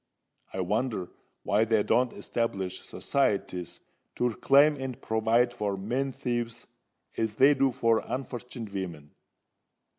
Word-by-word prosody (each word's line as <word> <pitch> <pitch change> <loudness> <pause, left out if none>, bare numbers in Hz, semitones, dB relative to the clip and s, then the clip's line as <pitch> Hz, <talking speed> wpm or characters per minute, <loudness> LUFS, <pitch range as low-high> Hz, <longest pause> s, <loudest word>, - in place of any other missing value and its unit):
I 95 - -3
wonder 105 0 -1 0.3
why 105 +2 +3
they 110 -2 +2
don't 125 0 +2
establish 95 -5 -2
societies 100 -9 -1 0.3
to 125 - +1
reclaim 140 +6 +5
and 130 -2 -5
provide 115 +2 +2
for 105 -4 -2
men 125 +8 -1
thieves, 120 -3 -3 0.5
as 110 -2 -1
they 135 +5 +6
do 135 -1 +2
for 115 -1 +2
unfortunit 125 -3 -5
vimen. 85 -7 -5
115 Hz, 120 wpm, -28 LUFS, 100-130 Hz, 0.5 s, they